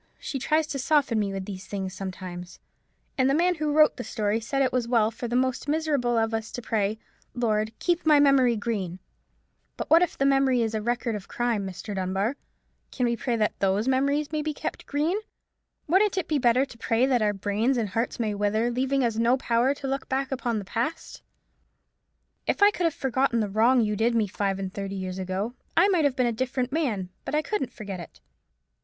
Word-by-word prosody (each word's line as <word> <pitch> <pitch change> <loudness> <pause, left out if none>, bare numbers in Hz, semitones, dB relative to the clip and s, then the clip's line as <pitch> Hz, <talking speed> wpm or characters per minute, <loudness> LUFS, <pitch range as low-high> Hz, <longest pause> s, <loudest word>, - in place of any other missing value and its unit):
she 270 - -5
tries 310 +4 +2
to 280 -2 -4
soften 270 -4 +2
me 200 -2 0
with 195 -1 -4
these 195 -2 -8
things 190 -2 -4
sometimes—and 185 +7 -6
the 275 - +3
man 355 +3 +3
who 305 -3 -2
wrote 305 0 +5
the 250 - -4
story 215 -1 -1
said 255 +5 -2
it 260 - 0
was 250 -2 0
well 230 -2 +3
for 235 +2 -5
the 240 - -2
most 260 +2 0
miserable 290 -6 +1
of 225 0 +1
us 225 0 -3
to - - -5
pray, 220 -2 -1 0.4
'Lord, 220 -3 0
keep 350 -1 0
my 305 -2 +5
memory 270 -4 +5
green!' 205 -5 -3 0.8
But - - -5
what 330 +1 +7
if 360 - 0
the 275 - +1
memory 270 -3 +3
is 225 0 -2
a 215 - -1
record 240 +1 -1
of 205 -2 -6
crime, 235 -5 -1
Mr. 190 +3 -6
Dunbar? 195 +6 -1 0.5
Can 250 - -1
we 235 0 +1
pray 240 0 -1
that 215 -2 +1
those 195 +4 +1
memories 280 +3 +1
may 305 -1 -1
be 305 0 -3
kept - - -5
green? 310 +8 0 0.7
Wouldn't 385 +4 +3
it 365 - -1
be 300 -2 +1
better 250 +2 +3
to 250 - -14
pray 230 +3 +2
that 255 -3 +2
our 210 -1 +3
brains 205 +6 0
and 220 -4 -1
hearts 230 +5 -2
may 220 -3 0
wither, 210 +3 0
leaving 265 +2 0
us 230 -2 0
no 235 +3 +3
power 245 +2 +1
to 275 - -6
look 270 0 -3
back 265 +1 -1
upon 245 -3 -1
the 205 - -4
past? 245 - -4 1.3
If - - +2
I 410 - +7
could 360 -4 -2
have 330 - +1
forgotten 260 -2 +1
the 210 -3 -1
wrong 235 +4 +4
you 210 -1 0
did 230 +3 +1
me 225 -2 +3
five 195 -1 -2
and 190 -1 -5
thirty 195 -1 -4
years 185 -1 -4
ago, 190 +5 -3 0.2
I 370 +4 +6
might 350 -6 +3
have 280 -3 +2
been 255 -2 +2
a 240 - +2
different 255 +2 -2
man: 235 - -1
but - - -3
I 305 - +2
couldn't 300 - -2
forget 200 -5 -7
it. 170 - -11
240 Hz, 215 wpm, -26 LUFS, 210-275 Hz, 1.3 s, what